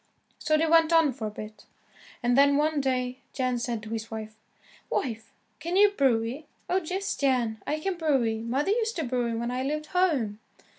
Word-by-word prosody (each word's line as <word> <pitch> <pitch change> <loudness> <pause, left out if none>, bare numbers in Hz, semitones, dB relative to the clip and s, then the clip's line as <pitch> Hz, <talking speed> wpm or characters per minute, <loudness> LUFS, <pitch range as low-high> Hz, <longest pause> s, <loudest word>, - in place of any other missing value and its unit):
So 310 - +2
they 320 - +2
went 325 0 +4
on 325 -4 +4
for 230 -3 -4
a - - -3
bit, 210 0 -10 0.6
and 240 0 +3
then, 280 +1 +5
one 300 0 +1
day, 255 -1 -1
Jan 255 -2 0
said 235 -2 -3
to 215 - -8
his 225 0 -4
wife, 220 -1 -7 0.5
"Wife 225 -4 -3 0.3
can 340 +2 -3
you 410 +1 +6
brew 260 - +2
y?" 275 +7 -6 0.2
"Oh, 370 +1 +1
yes, 375 +5 -2
Jan, 245 -5 0
I 305 - -1
can 375 +3 -2
brew 305 -5 +3
y. 220 0 -1
Mother 265 - 0
used 450 +1 0
to 325 - -2
brew 245 -2 -1
y 225 - -2
when 235 +1 -2
I 250 +1 -2
lived 305 +3 -2
home." 280 - +1
265 Hz, 205 wpm, -27 LUFS, 230-315 Hz, 0.6 s, you